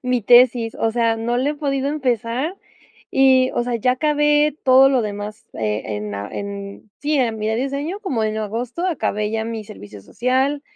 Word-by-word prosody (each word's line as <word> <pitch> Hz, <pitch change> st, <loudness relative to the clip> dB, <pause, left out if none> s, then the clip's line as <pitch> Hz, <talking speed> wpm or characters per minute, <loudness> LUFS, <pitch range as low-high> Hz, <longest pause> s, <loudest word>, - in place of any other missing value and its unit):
mi 250 Hz, -1 st, 0 dB
tesis, 240 Hz, 0 st, +5 dB
o 225 Hz, -, 0 dB
sea, 230 Hz, -1 st, +1 dB
no 235 Hz, +2 st, -1 dB
la 265 Hz, +4 st, +1 dB
he 300 Hz, -, -4 dB
podido 275 Hz, -2 st, -1 dB
empezar 260 Hz, -, -1 dB, 0.5 s
y, 260 Hz, -1 st, +4 dB
o -, -, +1 dB
sea, 245 Hz, 0 st, -2 dB
ya 250 Hz, +3 st, +2 dB
acabé 295 Hz, +1 st, +2 dB
todo 265 Hz, +1 st, +7 dB
lo 260 Hz, -3 st, +2 dB
demás, 210 Hz, 0 st, -6 dB
eh, 105 Hz, -1 st, -2 dB
en 105 Hz, -1 st, -4 dB
en 200 Hz, -, -7 dB
sí, 295 Hz, 0 st, 0 dB
eh, 250 Hz, -3 st, +2 dB
mira 220 Hz, 0 st, -2 dB
diseño 280 Hz, -, -3 dB
como 260 Hz, -, -1 dB
en 215 Hz, 0 st, -2 dB
agosto, 230 Hz, -, -3 dB
acabé 210 Hz, -, -1 dB
ya 220 Hz, 0 st, -2 dB
mi 225 Hz, -1 st, -5 dB
servicio 105 Hz, -, -11 dB
social, 260 Hz, -, -1 dB
245 Hz, 180 wpm, -20 LUFS, 215-275 Hz, 0.5 s, todo